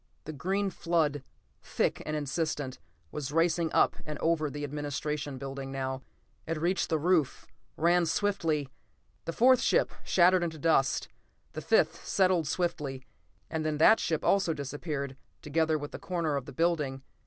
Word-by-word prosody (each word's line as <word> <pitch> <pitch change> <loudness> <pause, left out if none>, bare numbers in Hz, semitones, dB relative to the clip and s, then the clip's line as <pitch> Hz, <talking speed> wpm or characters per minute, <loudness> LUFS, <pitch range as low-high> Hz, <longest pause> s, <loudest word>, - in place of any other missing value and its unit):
The 155 - -7
green 190 +7 -1
flood, 160 -5 0 0.4
thick - - -1
and 155 - -1
insistent, 145 -2 -2 0.3
was 145 -2 -4
racing 165 +1 +2
up - - +3
and 150 -1 -5
over 160 -2 +1
the 145 +1 -6
administration 145 0 -3
building 135 0 -6
now. 130 -1 -3 0.5
It 165 0 -1
reached 175 +4 0
the 160 - +2
roof, 160 -3 +1 0.3
ran 170 +1 +3
swiftly.... 165 -5 0 0.6
The 165 - -2
fourth 255 +7 +5
ship - - +2
shattered 180 0 +4
into 165 -2 -3
dust. 145 -3 +2 0.5
The 155 - -5
fifth 170 -4 +2
settled 185 -5 +2
swiftly 145 -5 -2 0.4
and 160 -1 -3
then 155 -1 -1
that 220 +8 +6
ship 160 -2 -1
also 190 -5 +3
disappeared, 140 -1 -4 0.3
together 160 +1 +1
with 145 0 -7
a - - -6
corner 170 -5 -1
of 140 -2 -3
the - - -7
building. 150 -6 0
155 Hz, 155 wpm, -29 LUFS, 145-170 Hz, 0.6 s, that